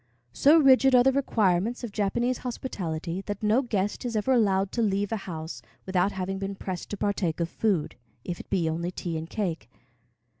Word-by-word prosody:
So 300 +3 +6
rigid 270 -3 +6
are 245 - +7
the 270 - +5
requirements 225 -4 +1
of 235 - -4
Japanese 235 +5 0
hospitality 180 -8 -4
that 205 0 -4
no 215 +5 +4
guest 205 -6 -2
is 240 -2 -3
ever 215 +5 +1
allowed 195 -6 +2
to 235 - -1
leave 205 -1 0
a - - +1
house 160 -1 -6 0.2
without 190 +1 +1
having 190 0 -3
been 195 0 -4
pressed 185 -2 -6
to 205 - -4
partake 195 -5 -1
of 170 -1 -1
food, 190 -6 0 0.3
if 175 - -4
it - - -11
be 180 -4 +1
only 165 +2 -2
tea 175 -2 -4
and 160 +1 -5
cake. 170 - -3
200 Hz, 190 wpm, -27 LUFS, 180-235 Hz, 0.3 s, are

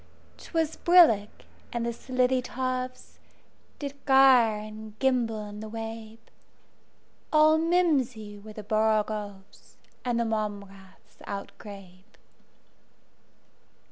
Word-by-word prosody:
'T - - -14
was 320 -2 0
brillig, 315 - +5 0.4
and 235 -1 -2
the 235 - -2
slithy 255 +1 0
tovesDid 255 +2 -7
gyre 260 -5 +6
and 215 0 -9
gimble 235 -5 0
in 205 0 -9
the 215 0 -7
wabe; 225 0 -7 1.1
All 310 0 +5
mimsy 270 - 0
were 215 +1 -11
the 215 - -8
borogoves, 215 -2 -2 0.3
And 240 -2 0
the 235 - +1
mome 215 -2 -2
raths 195 -1 -19
outgrabe. 200 0 -10
225 Hz, 100 wpm, -27 LUFS, 210-255 Hz, 1.1 s, gyre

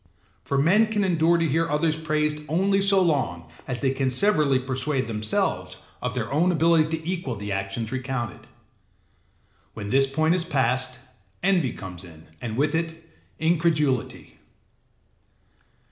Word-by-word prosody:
For 140 - -1
men 190 +10 +4
can 210 -2 0
endure 170 -2 +3
to 165 -1 +1
hear 165 +3 +1
others 155 +1 +1
praised 150 -1 -1
only 195 +5 +2
so 195 0 +4
long 130 - 0 0.2
as 125 -1 -3
they 135 -2 +2
can 135 0 0
severally 150 -2 +3
persuade 130 +1 -2
themselves 110 -1 -2 0.2
of - - -3
their - - -3
own 170 +5 +3
ability 160 -1 +3
to 160 0 -10
equal 175 -9 -2
the 100 0 -5
actions 100 +3 -3
recounted: 130 -4 -4 1.3
when 105 -2 -5
this 135 +1 +4
point 155 +4 +1
is 180 -1 0
passed, 130 -5 0 0.5
envy 180 -9 +2
comes 90 -2 -9
in 80 -3 -14 0.2
and 115 -2 -4
with 145 +2 +1
it 165 0 -4 0.2
incredulity. 160 -6 0
150 Hz, 145 wpm, -25 LUFS, 130-165 Hz, 1.3 s, men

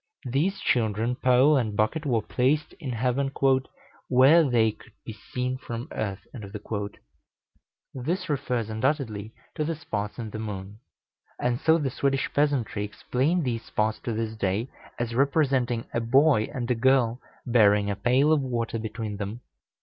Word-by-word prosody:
These 160 +11 0
children, 115 0 +1
pole, 130 +4 +4
and 110 -5 -1
bucket 145 +9 0
were 115 -4 +1
placed 140 +4 0
in 140 -6 -4
heaven, 130 +3 0 0.8
"where 135 +6 +6
they 120 -6 +3
could 105 - -18
be 110 - -6
seen 125 +4 -4
from 120 -1 -6
earth." 100 -2 -4 1.7
This 170 +9 -2
refers 125 -6 -1
undoubtedly 110 -3 -1 0.2
to 155 - -2
the 165 +2 -2
spots 105 -9 -4
in 115 -3 -5
the 110 - -5
moon; 100 -1 -6 0.6
and 120 0 0
so 160 0 +4
the 140 -5 -1
Swedish 135 +1 -1
peasantry 140 -8 +1
explain 130 - 0
these 115 -4 -2
spots 110 0 -1
to 120 - -4
this 110 0 -3
day, 105 +4 -1 0.3
as 120 -1 -2
representing 135 -3 +1
a - - +1
boy 130 -1 +4
and 125 -1 -3
a - - +5
girl 125 0 +2 0.2
bearing 105 -4 +4
a - - -2
pail 130 +8 +3
of 150 - +2
water 115 -3 -2
between 110 -1 -5
them. 105 +4 -5
120 Hz, 150 wpm, -26 LUFS, 110-135 Hz, 1.7 s, where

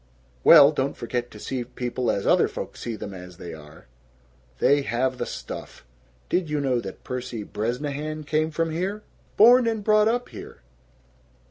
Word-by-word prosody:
"Well, 150 -3 +9
don't 140 -2 -2
forget 120 +1 -3
to 105 - -13
see 125 +4 -4
people 125 0 -3
as 100 - -1
other - - +4
folks - - -7
see 115 -2 -4
them 100 -2 -7
as 90 -1 -11
they 85 -3 -8
are! 75 -2 -13 0.7
They 145 - +3
have 130 +1 -1
the - - -2
stuff. - - -8 0.4
Did 180 -3 0
you 150 -1 -1
know 130 -3 +1
that 95 -4 -8
Percy 125 -3 -5
Bresnahan 145 +9 -4
came 155 +1 0
from 165 +1 -1
here? 190 +6 -3 0.3
Born 240 +3 +7
and 220 -2 -1
brought 215 0 +4
up 245 +2 0
here!" - - -11
135 Hz, 165 wpm, -24 LUFS, 120-160 Hz, 0.7 s, Well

